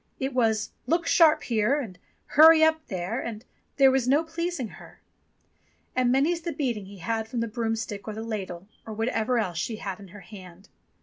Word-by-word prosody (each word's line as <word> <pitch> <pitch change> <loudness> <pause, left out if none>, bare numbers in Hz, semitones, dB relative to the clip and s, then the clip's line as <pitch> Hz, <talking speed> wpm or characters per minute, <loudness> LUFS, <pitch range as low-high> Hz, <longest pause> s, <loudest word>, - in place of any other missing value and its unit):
It 265 0 -2
was 220 -3 +1 0.2
"Look 335 +1 +1
sharp 320 -3 +4
here" 235 +4 +1
and 195 -10 -7 0.3
"Hurry 315 +2 +7
up 315 0 +2
there," 185 +4 -3
and 225 0 -7 0.3
there 270 -2 +6
was 260 -2 +1
no 285 +5 +3
pleasing 330 -6 -4
her. - - -15 1.0
And 250 -1 +2
many's 310 +6 +2
the 335 - -4
beating 240 -9 -3
he 200 0 -12
had 220 +4 -3
from 240 0 -4
the 230 - -1
broomstick 225 -3 -4
or 215 - -4
the 220 - -5
ladle, 195 -5 -5 0.2
or 220 - -8
whatever 225 +2 0
else 180 -7 -1
she 220 +6 -3
had 195 -3 -6
in 200 - -12
her 200 +3 -13
hand. 185 0 -13
230 Hz, 190 wpm, -26 LUFS, 210-280 Hz, 1.0 s, Hurry